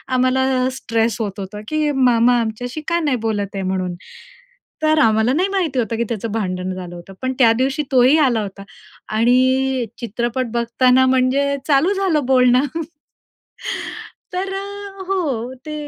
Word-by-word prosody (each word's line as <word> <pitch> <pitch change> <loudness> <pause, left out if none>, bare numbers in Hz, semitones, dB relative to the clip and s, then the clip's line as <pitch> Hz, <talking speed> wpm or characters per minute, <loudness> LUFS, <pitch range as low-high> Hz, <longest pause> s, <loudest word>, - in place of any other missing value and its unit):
आम्हाला 255 0 +2
स्ट्रेस 230 -4 -1
होत 205 -2 -4
होतं 200 +2 -6
की 310 -1 0
मामा 245 -2 +3
आमच्याशी 245 +6 -4
का 340 +1 +1
नाही 290 -6 0
बोलत 205 -2 -2
आहे 195 - -2
म्हणून, 185 -1 -2 0.9
तर 310 0 +3
आम्हाला 220 -2 +3
नाही 360 +6 +2
माहिती 350 -9 0
होतं 230 -1 -1
की 235 - +1
त्याचं 230 -1 -3
भांडण 185 -4 -2
झालं 180 -1 -7
होतं 175 +3 -11
पण 260 0 -1
त्यादिवशी 260 +5 +3
तोही 260 +3 +5
आला 250 -7 +3
होता 195 -1 -7 0.5
आणि 255 +2 +2
चित्रपट 240 +2 -2
बघताना 250 +2 +3
म्हणजे 260 +2 +2
चालू 305 +7 +3
झालं 370 -8 0
बोलणं. 255 0 +4 1.7
तर 380 +2 -3
अ, 400 0 -7
हो. 275 -11 -1
ते 305 - -5
255 Hz, 145 wpm, -19 LUFS, 225-280 Hz, 1.7 s, तोही